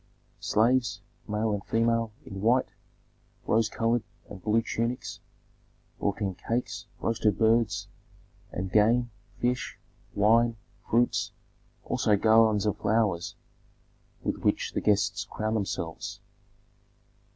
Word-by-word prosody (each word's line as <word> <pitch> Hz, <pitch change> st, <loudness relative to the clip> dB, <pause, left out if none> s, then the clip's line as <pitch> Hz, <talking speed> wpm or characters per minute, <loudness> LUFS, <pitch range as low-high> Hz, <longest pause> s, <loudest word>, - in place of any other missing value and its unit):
Slaves, 115 Hz, -2 st, +2 dB, 0.3 s
male 105 Hz, 0 st, 0 dB
and 100 Hz, -, -3 dB
female, 115 Hz, 0 st, +1 dB
in 95 Hz, -1 st, -7 dB
white, 120 Hz, +4 st, +3 dB, 0.8 s
rose 110 Hz, 0 st, +2 dB
colored, 115 Hz, +2 st, +1 dB, 0.3 s
and 95 Hz, -, -10 dB
blue 110 Hz, +4 st, +2 dB
tunics, 115 Hz, +2 st, -3 dB, 0.8 s
brought 100 Hz, +1 st, -1 dB
in 95 Hz, -2 st, 0 dB
cakes, 115 Hz, +6 st, -3 dB
roasted 110 Hz, -2 st, +1 dB
birds, 115 Hz, -2 st, +2 dB, 0.6 s
and 95 Hz, 0 st, -4 dB
game, 115 Hz, +4 st, +3 dB, 0.3 s
fish, 125 Hz, +1 st, -1 dB, 0.4 s
wine, 115 Hz, +3 st, +4 dB, 0.3 s
fruits, 120 Hz, +2 st, +2 dB, 0.5 s
also 105 Hz, -, +2 dB
garlands 110 Hz, -1 st, +4 dB
of 105 Hz, -, 0 dB
flowers 105 Hz, -6 st, +1 dB, 0.9 s
with -, -, -1 dB
which -, -, 0 dB
the -, -, -1 dB
guests 100 Hz, -1 st, +2 dB
crowned 110 Hz, +1 st, -2 dB
themselves. 90 Hz, -5 st, -3 dB
110 Hz, 105 wpm, -28 LUFS, 105-115 Hz, 0.9 s, wine